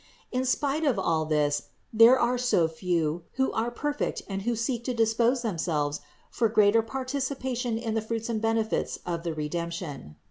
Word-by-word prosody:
In 255 +1 0
spite 285 +4 0
of 275 -8 +2
all 165 -4 +1
this 150 -2 0 0.2
there 230 +4 +8
are 245 0 +1
so 210 -9 +3
few, 165 -1 -1
who 265 0 +1
are 225 +2 -1
perfect 290 +4 -2
and 195 -1 -3
who 235 +4 0
seek 235 +1 -2
to 250 - -1
dispose 230 +2 +2
themselves 160 -8 -1 0.3
for 230 - +1
greater 210 +1 +5
participation 255 -1 -2
in 225 -1 -3
the 225 - 0
fruits 225 +1 -3
and 225 -2 -2
benefits 225 0 0
of 170 -1 -2
the 165 -2 -3
Redemption. 155 - -4
225 Hz, 170 wpm, -27 LUFS, 170-245 Hz, 0.3 s, there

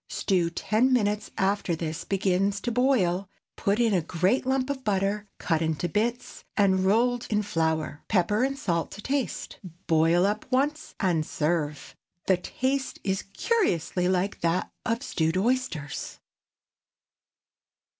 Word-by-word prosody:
Stew 180 -4 +1
ten 215 +9 +1
minutes 210 -4 +1
after 190 -3 +1
this 160 0 -4
begins 195 +1 +1
to 240 - -2
boil; 200 -7 +2 0.3
put 200 +3 0
in 230 -3 +3
a 180 - +3
great 180 +11 0
lump 265 +1 +1
of 265 -2 -5
butter, 205 0 0
cut 165 -2 0
into 160 +1 0
bits, 230 +8 -2
and 190 -2 +3
rolled 240 +4 +2
in 210 -1 +1
flour; 160 -5 -1
pepper 205 +4 +2
and 275 +1 0
salt 170 - -1
to 205 - -9
taste. 275 -2 -2 0.3
Boil 165 +3 +4
up 210 +5 -2
once, 290 +4 0
and 175 -6 +2
serve. 150 -2 -2 0.3
The 190 - +4
taste 265 +8 -2
is 190 -1 -1
curiously 180 - +1
like 185 +2 0
that 170 +2 0 0.2
of 230 +2 0
stewed 160 - 0
oysters. 200 - -1
195 Hz, 135 wpm, -27 LUFS, 170-240 Hz, 0.3 s, Boil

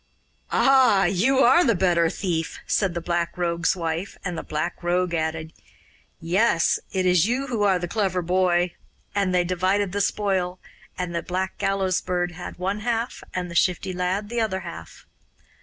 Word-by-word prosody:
'Ah! 260 -7 +4
you 220 +10 +2
are 270 +8 +6
the 230 -5 +3
better 175 -2 +2
thief,' 165 -3 -3
said 190 -4 0
the 170 - -2
Black 170 0 -2
Rogue's 170 0 0
wife; 170 +2 -3
and 180 -2 -2
the - - -4
Black 155 +3 -4
Rogue 175 0 0
added: 160 0 -2 0.7
'Yes, 175 +1 +2
it 190 -1 0
is 180 +1 +4
you 255 +4 0
who 240 -5 -2
are 195 -2 +3
the 175 0 -4
clever 185 -3 -1
boy'; 180 0 +2 0.4
and 200 -2 +1
they 180 -1 +3
divided 185 +2 0
the 205 +2 -1
spoil 190 -3 0 0.4
and 180 -1 -3
the 170 - -1
Black 185 +1 -3
Gallows 195 -2 0
Bird 175 -1 -1
had 180 +1 -8
one 190 +3 -2
half 235 +1 -2
and 180 -1 -3
the - - -6
Shifty 180 +1 +1
Lad 185 +3 -2
the 235 0 -1
other 190 -4 -1
half. 80 - -10
180 Hz, 175 wpm, -24 LUFS, 175-200 Hz, 0.7 s, are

